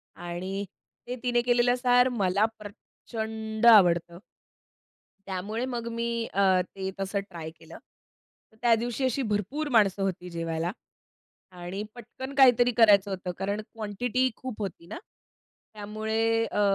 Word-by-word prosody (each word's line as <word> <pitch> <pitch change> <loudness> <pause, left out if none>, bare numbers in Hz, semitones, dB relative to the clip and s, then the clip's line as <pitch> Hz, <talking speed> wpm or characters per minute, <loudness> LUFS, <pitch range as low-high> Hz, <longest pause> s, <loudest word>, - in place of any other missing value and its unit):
आणि 185 +3 -5 0.4
ते 250 - -3
तिने 240 -1 +2
केलेलं 245 0 +3
सार 245 0 +4
मला 195 +2 +3
प्रचंड 220 +1 -6
आवडतं. 175 -6 +6 1.1
त्यामुळे 200 +5 -3
मग 235 0 -5
मी 235 0 -1 0.2
अ, 200 - +2 0.3
ते 190 -1 -4
तसं 195 +1 -1
ट्राय 165 -2 -7
केलं. 160 - -14 0.7
तर 220 - -23
त्या 235 -1 +5
दिवशी 245 +2 -2
अशी 260 +2 0
भरपूर 260 +10 -2
माणसं 200 -3 +4
होती 180 -2 -3
जेवायला. 165 0 -2 0.8
आणि 180 +2 -6
पटकन 245 +3 -9
काहीतरी 245 -3 +6
करायचं 205 -3 +6
होतं 185 -1 -4
कारण 200 +2 -2
क्वांटिटी 225 +4 -2
खूप 255 -4 -7
होती 170 -3 -6
ना, - - -7 0.8
त्यामुळे 215 +2 -2 0.2
अ, 210 - -2
215 Hz, 130 wpm, -27 LUFS, 190-240 Hz, 1.1 s, आवडतं